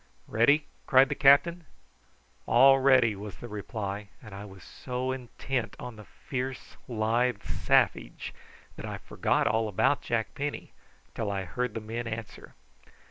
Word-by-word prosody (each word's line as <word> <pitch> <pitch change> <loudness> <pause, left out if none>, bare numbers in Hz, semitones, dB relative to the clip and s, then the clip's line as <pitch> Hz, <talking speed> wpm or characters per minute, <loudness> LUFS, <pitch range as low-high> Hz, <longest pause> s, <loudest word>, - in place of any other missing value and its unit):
"Ready?" 140 +7 +3 0.2
cried 130 +1 +6
the - - 0
captain. 155 +5 +4 0.8
"All 135 +3 +7
ready!" 130 -5 +5
was 105 +1 -8
the 120 - -9
reply; 105 -1 -5
and 110 -4 -12
I 100 +1 -7
was 95 -2 -13
so 125 +5 -4
intent 125 -1 -4
upon 125 -2 -8
the 105 -1 -12
fierce 130 +3 -6
lithe 115 0 0
savage - - +1 0.4
that - - -6
I - - -5
forgot - - 0
all 110 0 +1
about 105 +7 +2
Jack 115 -2 -2
Penny 145 +1 -4 0.4
till 110 -3 -3
I 100 -1 -2
heard 125 +7 -3
the 115 - -3
men 115 +2 -5
answer. 110 -1 -7
120 Hz, 145 wpm, -28 LUFS, 105-130 Hz, 0.8 s, All